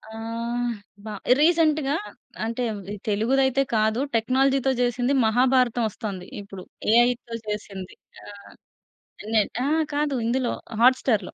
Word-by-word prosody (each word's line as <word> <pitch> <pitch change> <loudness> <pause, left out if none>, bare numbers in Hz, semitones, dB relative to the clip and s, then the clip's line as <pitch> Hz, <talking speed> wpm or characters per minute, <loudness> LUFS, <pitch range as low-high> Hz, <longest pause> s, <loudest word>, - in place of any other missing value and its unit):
ఆహ్, 235 +2 -3 0.3
బా 215 - -5 0.3
రీసెంట్‌గా 310 -3 +3 0.5
అంటే, 230 +2 -2 0.4
తెలుగుది 225 +6 +2
అయితే 265 +1 +2
కాదు. 220 +3 +2
టెక్నాలజీతో 265 +3 +2
చేసింది. 245 +2 +1
మహాభారతం 245 +1 +3
వొస్తోంది. 195 -4 -6
ఇప్పుడు 195 -2 -10 0.3
ఏఐతో 240 -1 +2
చేసింది 200 -3 -6 0.3
ఆహ్, 205 -1 -12 0.7
ఇనెట్ 215 -1 +1
ఆ - - 0 0.3
కాదు, 290 -1 0
ఇందులో 250 +1 0 0.3
హాట్ 255 +2 +6
స్టార్‌లో. 215 -7 0
240 Hz, 110 wpm, -24 LUFS, 215-265 Hz, 0.7 s, హాట్